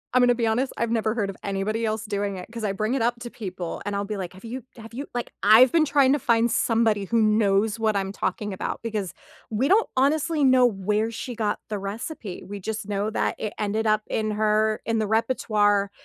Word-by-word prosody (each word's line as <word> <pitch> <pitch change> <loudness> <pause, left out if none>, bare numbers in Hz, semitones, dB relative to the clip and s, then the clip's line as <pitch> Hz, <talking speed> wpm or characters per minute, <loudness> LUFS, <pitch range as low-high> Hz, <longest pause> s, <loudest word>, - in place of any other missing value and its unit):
I'm 255 - +6
gonna 245 0 +4
be 235 -1 0
honest, 245 +4 +1
I've 230 0 -1
never 220 -1 0
heard 205 -4 -1
of 190 - -15
anybody 205 +3 -1
else 220 0 -2
doing 200 -2 -2
it 180 - -8
‘cause 230 -1 -6
I 205 - 0
bring 215 +4 -1
it 265 - 0
up 240 +1 0
to 240 - -7
people 185 -5 -6
and 205 0 -3
I'll 200 0 -1
be 215 - -4
like, 185 -2 -5
“Have 190 +4 -13
you 245 +2 -6
have 225 0 -11
you, 275 +4 -5
like 240 - -3
“I've 220 +5 +7
been 325 -2 +4
trying 280 -2 +4
to 290 - +1
find 230 0 +2
somebody 225 -4 +2
who 230 +3 +1
knows 215 0 +2
what 220 -1 +1
I'm 195 -1 -1
talking 210 0 -3
about 190 - -4
because 210 -6 -3 0.4
we 230 +5 0
don't 430 +4 +3
honestly 300 +3 +2
know 255 -2 +6
where 210 +1 0
she 240 +2 -6
got 210 -2 -1
the 210 - -3
recipe. 205 - -6
We 205 +1 -6
just 215 +1 -5
know 205 +1 -1
that 220 - -1
it 215 - -3
ended 215 +1 -1
up 215 0 +2
in 215 -1 -1
her 215 0 +1
in 225 0 0
the 215 - 0
repertoire 210 -3 +2
220 Hz, 230 wpm, -25 LUFS, 205-235 Hz, 0.4 s, I've